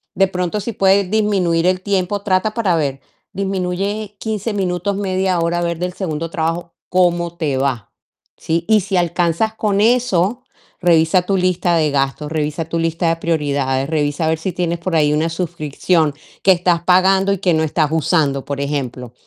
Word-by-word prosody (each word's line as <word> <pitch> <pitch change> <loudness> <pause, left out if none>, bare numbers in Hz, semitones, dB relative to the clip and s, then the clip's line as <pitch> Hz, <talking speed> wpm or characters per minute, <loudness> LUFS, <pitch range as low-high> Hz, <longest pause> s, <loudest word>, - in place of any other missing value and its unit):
De 195 +1 +3
pronto, 180 +2 -2
si 235 - -4
puede 195 +1 +3
disminuir 185 -5 +1
el 185 0 +1
tiempo, 200 0 -1
trata 200 +1 0
para 200 -7 +1
ver. 135 -4 -2 0.3
Disminuye 195 +2 -2
15 220 0 -3
minutos, 190 0 -1
media 190 -2 0
hora, 170 +1 0
a - - -2
ver 170 -1 -1
del 180 0 -3
segundo 165 -4 -4
trabajo 165 +1 -2 0.2
cómo 175 -1 +1
te 145 -5 -1
va, 130 -6 -2 0.5
¿sí? 165 +1 -2
Y 215 -1 +5
si 190 0 -1
alcanzas 175 +5 +1
con 205 -2 0
eso, 235 -1 +2 0.4
revisa 170 +1 +4
tu 195 +1 0
lista 180 -1 +1
de 155 -3 +2
gastos, 140 +2 -1
revisa 155 0 -2
tu 165 +1 -3
lista 165 +1 0
de 165 - +2
prioridades, 140 -5 -1
revisa 150 0 0
a - - +1
ver 160 0 0
si 185 +3 -3
tienes 170 -1 -2
por 170 -1 -2
ahí 150 -1 +3
una 160 +2 +1
suscripción 165 -2 0 0.3
que 190 - +6
estás 175 -1 +2
pagando 190 +2 +4
y 195 - +1
que 180 -4 +2
no 160 0 +2
estás 155 -1 +1
usando, 150 -4 +1
por 140 -1 -4
ejemplo, 130 -4 -4
175 Hz, 180 wpm, -18 LUFS, 160-190 Hz, 0.5 s, que